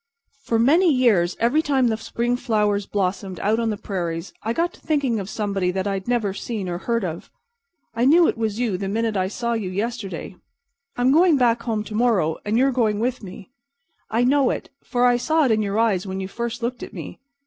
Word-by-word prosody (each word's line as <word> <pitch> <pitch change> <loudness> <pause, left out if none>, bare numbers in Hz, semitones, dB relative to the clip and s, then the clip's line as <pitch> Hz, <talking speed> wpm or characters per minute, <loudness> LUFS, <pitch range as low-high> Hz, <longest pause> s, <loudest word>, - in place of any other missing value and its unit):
"For 230 -4 0
many 315 +10 +4
years 220 -10 +2
every 240 +7 +3
time 270 -5 +2
the 220 - +1
spring 235 +2 -1
flowers 210 -5 0
blossomed 190 -1 -2
out 215 +3 +1
on 230 -1 0
the 210 - -2
prairies 170 -4 -4
I 225 - -2
got 335 +8 0
to - - -18
thinking 275 -7 0
of 195 0 -6
somebody 200 -4 -1
that 190 +1 -2
I'd 195 -2 -3
never 230 -5 0
seen 210 -2 -4
or 175 0 -3
heard 230 0 -1
of. 170 -1 -6 0.6
I 230 +2 +1
knew 330 +5 +6
it - - 0
was 220 -2 -2
you 220 -7 0
the 195 - -3
minute 220 +2 -1
I 185 -1 +1
saw 235 +4 -2
you 215 -5 -2
yesterday. 195 -3 -4 0.6
I'm 245 +2 +3
going 330 +1 +5
back 240 -2 +2
home 225 -3 -2
to 215 - -9
morrow, 210 -9 +1
and 210 +2 0
you're 270 +2 +3
going 225 -5 +1
with 250 +2 -1
me. 195 +2 -11 0.6
I 230 +2 +1
know 270 +1 +3
it, - - -4
for 245 -1 +1
I 245 -1 +4
saw 310 +5 +2
it 250 - +2
in 215 -1 +2
your 200 0 -2
eyes 205 -5 +1
when 190 0 -4
you 190 - -4
first 235 +3 -5
looked 245 +1 -3
at - - -8
me. - - -8
225 Hz, 220 wpm, -22 LUFS, 195-245 Hz, 0.6 s, knew